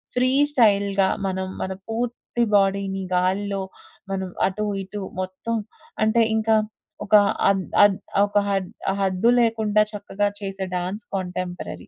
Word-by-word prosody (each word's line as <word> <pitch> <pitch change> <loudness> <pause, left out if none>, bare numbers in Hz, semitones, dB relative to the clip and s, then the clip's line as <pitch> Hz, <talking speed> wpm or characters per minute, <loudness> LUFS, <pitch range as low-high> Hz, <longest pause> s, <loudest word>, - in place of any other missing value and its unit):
Free 255 +1 +3 0.2
స్టైల్‌గా 200 -6 +3 0.2
మనం 190 0 -2
మన 190 - -2 0.2
పూర్తి 240 +1 -2
బాడీని 195 -1 +1
గాలిలో, 195 +2 0 0.5
మనం 190 -1 -2 0.2
అటు, 210 +3 -3 0.2
ఇటు 205 +2 -7 0.2
మొత్తం 185 +5 -3 0.5
అంటే 230 +2 +4
ఇంకా 220 0 +2 0.5
ఒక 210 - +5 0.3
అన్ 195 -1 +1 0.2
అద్ 200 -2 +2 0.3
ఒక 205 0 -1
హద్ 195 -2 -1 0.3
హద్దు 195 +5 +2
లేకుండా 220 -2 +2
చక్కగా 205 0 -1
చేసే 195 -1 -4
డాన్స్ 190 +4 -4
కాంటెంపరరీ. 180 - -5
200 Hz, 120 wpm, -23 LUFS, 190-215 Hz, 0.5 s, ఒక